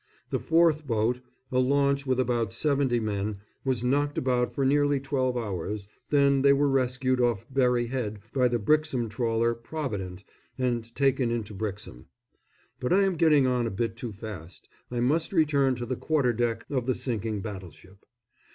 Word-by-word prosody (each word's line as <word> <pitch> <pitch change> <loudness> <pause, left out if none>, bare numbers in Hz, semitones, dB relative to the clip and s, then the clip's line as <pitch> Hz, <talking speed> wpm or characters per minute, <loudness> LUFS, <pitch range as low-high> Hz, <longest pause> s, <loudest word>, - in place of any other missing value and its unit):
The - - 0
fourth 160 -2 +3
boat, 115 +1 +1 0.3
a 130 - +2
launch, 140 +1 +2
with 130 0 +1
about 120 -5 0
seventy 140 -3 +1
men, 105 -1 -2 0.3
was 130 -4 -1
knocked 145 +3 +1
about 125 -1 +1
for 135 - -1
nearly 145 +1 +3
twelve 130 -2 -1
hours, 100 -2 -4 0.2
then 140 -2 +4
they 140 0 +6
were 145 +1 +2
rescued 130 -1 +1
off 120 -5 +1
Berry 125 -2 +2
Head 115 -4 -3 0.2
by 130 -2 +3
the 120 0 0
Brixham 130 0 +1
trawler 115 +1 0
Provident 110 - -5 0.3
and 125 -3 0
taken 135 -3 +2
into 115 -3 -3
Brixham. 100 - -6 0.7
But 125 -2 -2
I 195 +2 +5
am 195 -1 +2
getting 150 -4 +4
on 125 -2 +1
a - - -1
bit 115 +2 -2
too 115 0 -6
fast 100 -5 -9 0.2
I 120 -1 -2
must 155 +6 +1
return 145 -6 +3
to 120 0 -5
the 130 +2 -2
quarter 140 -3 +1
deck 115 -1 -1
of 130 -3 -1
the 130 - +2
sinking 110 -4 -3
battleship. 95 -2 -9
125 Hz, 170 wpm, -27 LUFS, 110-140 Hz, 0.7 s, they